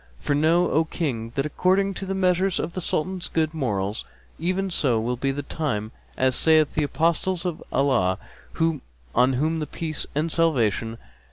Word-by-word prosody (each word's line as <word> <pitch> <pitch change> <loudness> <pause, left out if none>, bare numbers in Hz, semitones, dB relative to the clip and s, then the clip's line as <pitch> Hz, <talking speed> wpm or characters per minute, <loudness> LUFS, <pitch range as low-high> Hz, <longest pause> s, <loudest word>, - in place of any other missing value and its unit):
For 145 - -1
know, 160 +4 +3
O 160 +2 +3
King, 125 -9 -3
that 135 0 0
according 190 +6 +2
to 195 +1 -6
the 195 - -1
measure 185 0 +3
of 170 - -3
the 185 - -3
Sultan's 180 +2 -1
good 160 -1 0
morals, 105 -9 -1 0.4
even 185 +3 -1
so 125 -9 +2
will 120 +3 -1
be 135 +3 -1
the 145 +1 -4
time; 120 -9 -2 0.3
as 130 -1 +2
saith 155 -2 +4
the 155 - +1
Apostle 170 +5 +1
of 175 -3 -3
Allah 95 -10 +2 1.0
(on 125 +2 +4
whom 155 +5 0
be 155 - -2
peace 155 -3 -4
and 155 +2 0
salvation!) 115 -9 +1
155 Hz, 170 wpm, -24 LUFS, 130-170 Hz, 1.0 s, saith